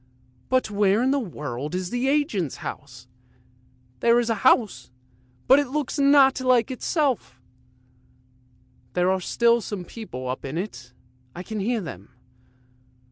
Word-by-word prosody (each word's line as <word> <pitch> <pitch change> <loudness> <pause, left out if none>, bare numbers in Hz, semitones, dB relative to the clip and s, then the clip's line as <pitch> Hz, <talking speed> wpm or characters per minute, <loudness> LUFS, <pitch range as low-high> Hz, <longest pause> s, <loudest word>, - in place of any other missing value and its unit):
But 255 -4 +1
where 205 +2 +2
in 260 - +2
the 280 - +2
world 150 - -5
is 185 -1 -3
the 245 +2 -1
agent's 270 - 0
house? 130 -3 -8 0.9
There 235 0 +4
is 235 -1 0
a 215 -3 -2
house, 210 - +2 0.6
but 270 - +6
it's 290 +1 -2
not 275 -1 +5
like 255 -1 +2
itself! 260 - -1 1.5
There 180 +1 +2
are 190 0 0
still 235 +5 +2
some 200 -4 -6
people 150 - -8
up 130 +1 -4
in 140 +3 -5
it, 130 - -6 0.4
I 180 - -6
can 220 +2 -5
hear 225 +3 -1
them. 100 - -9
215 Hz, 135 wpm, -24 LUFS, 170-255 Hz, 1.5 s, but